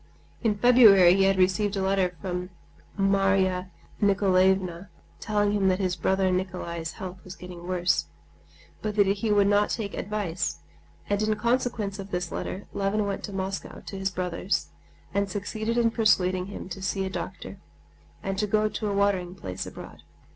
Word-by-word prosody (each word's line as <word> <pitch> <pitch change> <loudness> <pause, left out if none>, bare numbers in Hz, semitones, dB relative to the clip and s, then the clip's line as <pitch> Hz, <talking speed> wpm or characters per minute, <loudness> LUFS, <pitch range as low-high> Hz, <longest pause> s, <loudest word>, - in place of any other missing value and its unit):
In 215 -3 +1
February 210 -7 +7
he 195 0 +3
had 195 0 +3
received 190 +2 +2
a - - 0
letter 190 -2 +1
from 180 +1 -4 0.5
Marya 195 -2 +2 0.3
Nikolaevna 190 -2 +2 0.3
telling 205 -1 +1
him 200 -2 +2
that 185 -1 +3
his 185 -2 -1
brother 190 -1 +1
Nikolay's 175 -3 -3
health 185 -1 -8
was 185 0 -9
getting 180 -1 -10
worse, 175 - +1 0.7
but 215 -1 -3
that 205 -1 +5
he 200 +3 0
would 205 -1 +4
not 205 +1 +3
take 205 -3 -3
advice, 185 - -2 0.5
and 205 0 0
in 215 0 +1
consequence 230 -3 -1
of 195 0 -7
this 180 -2 -3
letter 195 - -5
Levin 200 +1 0
went 200 -1 -3
to 205 - -8
Moscow 195 0 -4
to - - -8
his 190 0 0
brother's 180 +1 -2 0.4
and 200 0 0
succeeded 215 +4 -3
in 230 -1 +3
persuading 185 -5 +2
him 200 - -7
to 190 +1 -7
see 190 +1 -1
a - - -3
doctor - - -6 0.6
and 195 0 -2
to 210 - +1
go 215 +1 +2
to 215 - -3
a 200 - -1
watering 195 -3 +1
place 95 - -6
abroad. - - -10
195 Hz, 170 wpm, -26 LUFS, 185-205 Hz, 0.7 s, February